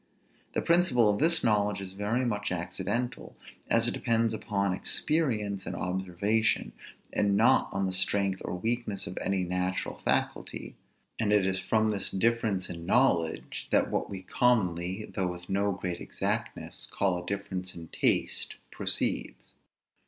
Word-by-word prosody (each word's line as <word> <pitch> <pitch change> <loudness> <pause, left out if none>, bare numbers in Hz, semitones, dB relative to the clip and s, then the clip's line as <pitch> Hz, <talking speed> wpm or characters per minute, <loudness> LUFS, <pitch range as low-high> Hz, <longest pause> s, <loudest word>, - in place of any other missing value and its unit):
The - - 0
principle 170 -10 +4
of 105 - -3
this 165 +2 +4
knowledge 105 -2 +2
is 95 -1 -6
very 105 +6 0
much 105 -5 -1
accidental, 95 +7 -3 0.3
as 115 0 +4
it - - 0
depends 115 -2 +1
upon 100 -3 -1
experience 105 - +1
and - - -3
observation, 95 +4 0 0.4
and 100 -1 +2
not 115 +4 +4
on 95 0 0
the 95 - -1
strength 95 0 +2
or - - -3
weakness 110 0 -2
of - - -6
any 95 -1 0
natural 90 +1 -2
faculty; - - -2 0.4
and 110 -2 +1
it 105 -2 +4
is 95 0 +1
from 110 +3 +2
this 100 -2 -2
difference 110 -3 +1
in 85 -1 -7
knowledge, 90 -10 +1
that - - +3
what - - -1
we 95 -2 -6
commonly, 95 -4 +1
though 95 -3 -2
with 90 0 -8
no 100 +1 +1
great 90 -2 -4
exactness, - - -3
call 95 -3 0
a - - -12
difference 95 -2 -4
in 85 -2 -9
taste - - +1 0.2
proceeds. - - -2
100 Hz, 150 wpm, -29 LUFS, 95-110 Hz, 0.4 s, principle